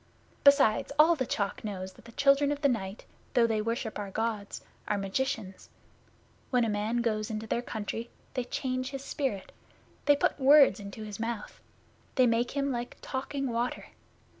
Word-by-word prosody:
Besides, 280 -4 +5
all 320 +3 +7
the 260 -5 -2
Chalk 200 -2 -2
knows 190 -3 -5
that - - -19
the 230 - -11
Children 280 +2 +4
of 290 0 -3
the 285 - +5
Night, 205 -5 -3 0.3
though 240 -2 +6
they 220 -2 +1
worship 230 0 -3
our 205 -1 -4
Gods, 215 0 -3 0.3
are 210 - +1
magicians. 195 -1 -3 0.8
When 250 -2 +3
a - - 0
man 215 +3 0
goes 215 -2 -1
into 220 0 -4
their 235 +2 -1
country, 225 0 -5 0.2
they 250 -2 -2
change 255 0 -2
his 275 -1 -6
spirit; 265 -11 -3 0.5
they 290 - +6
put 285 - 0
words 275 -6 +7
into 200 +1 -8
his 210 -1 -7
mouth; 225 -1 -4 0.6
they 255 - +5
make 235 +1 +2
him 280 0 +1
like 240 -1 -4
talking 275 0 -3
water. 235 +2 -2
235 Hz, 170 wpm, -29 LUFS, 210-265 Hz, 0.8 s, all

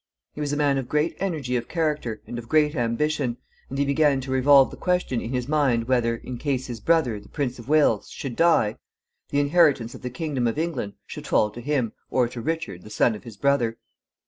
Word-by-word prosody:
He 150 - -6
was 145 -1 -1
a 145 - -1
man 140 -2 +2
of 125 - -6
great 150 +2 +1
energy 155 -10 -2
of 120 - -4
character 150 -9 -2
and 120 - -6
of 115 - -11
great 155 -1 +3
ambition, 120 0 0 0.3
and 135 - -5
he 140 - +2
began 140 -1 +3
to 130 0 -6
revolve 135 +1 +5
the - - -8
question 180 -9 0
in - - -5
his 125 -1 -2
mind 135 -6 +1
whether, 120 -2 +2
in 120 +1 -7
case 135 -3 -1
his 120 -3 -6
brother, 125 -5 +2
the - - -17
Prince 130 -4 -3
of 120 +3 -11
Wales, 155 -1 +3
should 130 -4 -6
die, 160 -10 +3 0.5
the 145 - +1
inheritance 145 -6 +3
of - - -11
the 125 - -4
kingdom 130 -2 -2
of 115 - -2
England 160 -11 -2
should - - -8
fall 105 - +2
to 120 - -9
him, 130 -4 -1 0.2
or 125 -2 +2
to 120 0 -7
Richard, 160 - -3
the 105 - -12
son 110 +2 +2
of 105 - -9
his 115 -4 -10
brother. 125 -4 +1
135 Hz, 225 wpm, -24 LUFS, 120-150 Hz, 0.5 s, revolve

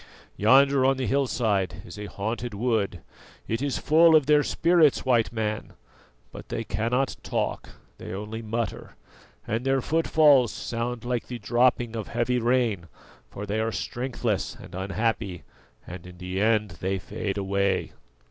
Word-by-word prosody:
Yonder 135 +5 +5
on 135 0 +3
the 130 - -1
hillside 105 -9 0
is - - -10
a 105 - -5
haunted 110 +4 -4
wood; 105 -6 -1 0.5
it 115 +2 -2
is 140 -2 -1
full 160 +1 +5
of 150 -3 +5
their 150 0 +5
spirits, 165 -2 +3
White 120 -3 +2
Man, 110 -2 -3 0.6
but - - -11
they 115 - -3
cannot 115 +6 -1
talk, - - -3 0.3
they - - -7
only 105 +4 -5
mutter, 115 -1 -4 0.5
and 115 +3 -2
their 135 0 +2
footfalls 150 -4 +4
sound 120 0 -4
like 120 -1 -2
the 125 - -5
dropping 120 -1 +1
of 110 -2 -4
heavy 120 +1 0
rain, 115 -7 +1 0.4
for 100 - -7
they 105 +2 -2
are 110 +1 0
strengthless 120 -3 -3
and - - -13
unhappy, 95 -2 -2 0.4
and 90 0 -9
in 90 0 -12
the 90 +2 -3
end 105 -1 +1
they 95 +1 0
fade 100 +1 -4
away." 100 0 0
115 Hz, 150 wpm, -26 LUFS, 100-130 Hz, 0.6 s, Yonder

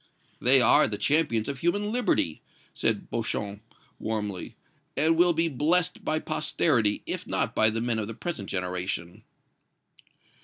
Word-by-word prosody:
"They 130 +2 +6
are 120 - +5
the 105 -1 -4
champions 140 -7 +1
of 140 -2 -4
human 205 +6 0
liberty," 235 - 0 0.3
said - - -1
Beauchamp, 100 0 -3 0.4
warmly, 105 -4 -4 0.4
"and 160 +3 +3
will 175 +1 +4
be 165 0 +1
blessed 165 +5 +1
by 155 - 0
posterity, 150 -8 0
if - - -5
not - - 0
by 110 - +5
the 115 +1 -2
men 120 -1 -1
of 105 - -3
the 115 - -7
present 140 - -5
generation." 90 -2 -4
120 Hz, 145 wpm, -26 LUFS, 105-165 Hz, 0.4 s, They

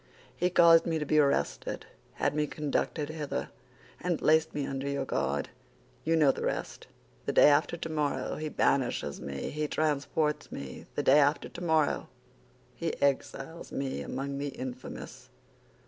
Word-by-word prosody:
He 180 - +1
caused 170 -2 +6
me 165 -1 +1
to 150 - -2
be 155 +1 +3
arrested, 140 -2 0 0.3
had - - 0
me 150 0 0
conducted 150 +1 -2
hither, 155 -2 -3 0.5
and 175 -2 0
placed 160 +1 +3
me 145 -2 -1
under 135 +1 -3
your 140 -1 -1
guard. - - -1 0.5
You 165 +1 +2
know 150 -4 +5
the - - -7
rest. - - -3 0.4
The - - +2
day - - +8
after 150 +3 +2
tomorrow 155 -3 -2
he 155 0 -3
banishes 135 -4 0
me, 70 -1 -4
he 150 +1 -2
transports 150 0 0
me; 65 -1 -7
the - - 0
day 140 +3 +6
after 145 +1 +2
tomorrow 160 -4 +1 0.7
he - - -3
exiles 140 +3 -1
me 135 -1 -3
among 140 +1 -4
the 145 - -2
infamous. 130 -2 -7
150 Hz, 150 wpm, -30 LUFS, 140-160 Hz, 0.7 s, day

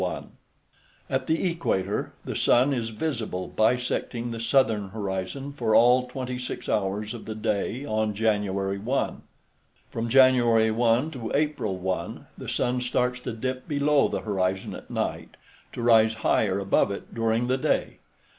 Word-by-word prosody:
At - - -1
the 165 +4 +1
equator, 165 - -1
the - - -4
sun 130 +4 +3
is 115 -3 -2
visible 110 - -3
bisecting 120 +1 0
the 115 - -5
southern 115 -4 +2
horizon 100 +6 -4
for 115 -6 +1
all 125 +2 +5
26 125 -1 -5
hours 105 +1 -1
of 120 - -9
the 110 - -5
day 110 +5 -2
on 110 -3 -1
January 100 -2 0
1. 125 +7 -1 0.7
From 115 0 -3
January 120 -3 +5
1 120 +6 +2
to 120 -6 -6
April 145 -10 0
1, 95 0 -3
the - - -7
sun 125 0 0
starts 125 0 0
to 125 - -5
dip 130 +3 -4
below 145 -1 +3
the - - -3
horizon 95 -2 -1
at - - -10
night, - - -3 0.4
to 120 - -5
rise 110 -1 +5
higher 100 -3 +2
above 100 0 +2
it 100 - -7
during 115 +1 +1
the 130 +2 0
day. - - 0
115 Hz, 145 wpm, -26 LUFS, 105-125 Hz, 0.7 s, all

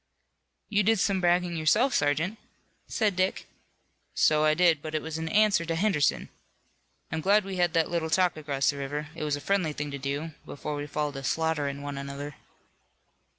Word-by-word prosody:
"You 210 -1 +2
did 220 +1 +3
some 190 0 +1
bragging 175 0 +2
yourself, 210 - +3
sergeant," 155 +9 0 0.5
said 210 -4 0
Dick. 185 +1 0 0.7
"So 155 0 +4
I 155 0 +4
did, 170 -3 +4
but 155 +1 -5
it 155 - 0
was 160 0 -4
in 160 0 -3
answer 210 -2 +3
to 165 0 -2
Henderson. 170 -5 +1 0.8
I'm 160 +1 -2
glad 200 +3 +3
we 195 -1 -5
had 175 -2 +2
that 165 -1 +1
little 165 -2 -1
talk 180 +2 +2
across 145 -3 0
the 145 - -9
river. 145 +2 -4
It 165 - -6
was 150 -1 0
a - - -6
friendly 180 -1 0
thing 145 0 -4
to 140 - -5
do, 140 +4 -3
before 150 +1 -5
we 145 0 -4
fall 150 0 -2
to 135 - -7
slaughterin' 145 -2 -1
one 145 -1 -5
another." 140 +1 -6
160 Hz, 190 wpm, -28 LUFS, 145-180 Hz, 0.8 s, So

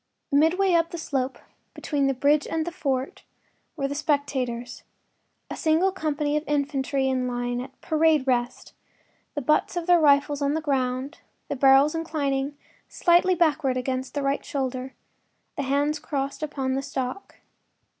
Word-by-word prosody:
Midway 340 +6 +3
up 335 -1 +3
the 340 - -6
slope 270 -5 -2 0.4
between 285 -3 -1
the 270 - 0
bridge 285 +3 +2
and 320 -1 -1
fort 270 -6 -2 0.5
were 275 -4 -1
the 280 - -4
spectators—a 265 -5 -4
single 325 +4 +2
company 300 -5 -1
of 300 - 0
infantry 280 -2 0
in 255 -1 0
line, 245 0 -2
at 260 +1 -11
“parade 315 -3 +2
rest,” 245 -1 -1 0.6
the 290 - -3
butts 305 +5 +1
of 345 - -2
their 350 -1 +5
rifles 290 -1 +3
on 285 +1 +1
the - - 0
ground, 270 -1 -2 0.3
the - - -1
barrels 270 +2 +5
inclining 290 -4 -2 0.3
slightly 355 +1 +3
backward 300 -6 +1
against 255 +1 -3
the 285 - -1
right 275 +1 0
shoulder, 265 -1 -4 0.6
the 295 - -2
hands 285 +3 0
crossed 280 -2 -3
upon 270 -4 -2
the 270 - -1
stock. 270 +5 -5
285 Hz, 145 wpm, -25 LUFS, 265-310 Hz, 0.6 s, their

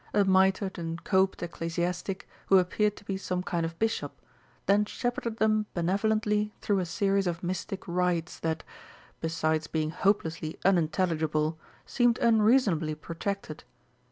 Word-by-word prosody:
A 205 -1 +4
mitred 190 0 +3
and 165 0 -5
coped 190 -2 +2
ecclesiastic, 175 +3 -3 0.2
who 195 - +6
appeared 205 +3 +2
to - - -15
be 195 -1 -2
some 180 -1 -2
kind 170 -3 -1
of 165 0 -10
Bishop, 225 +3 -1 0.5
then 205 +1 +4
shepherded 235 0 -3
them 215 -1 +2
benevolently 210 +4 +1
through 200 -2 +1
a 180 - -2
series 195 +2 +1
of 170 0 -3
mystic 185 +2 -4
rites 175 -1 0
that, 160 0 -2 0.6
besides 160 -1 0
being 155 -1 -1
hopelessly 165 -4 0
unintelligible, 160 -3 +1 0.3
seemed 240 -2 +2
unreasonably 215 -9 +3
protracted. 165 +1 -5
185 Hz, 130 wpm, -28 LUFS, 165-205 Hz, 0.6 s, who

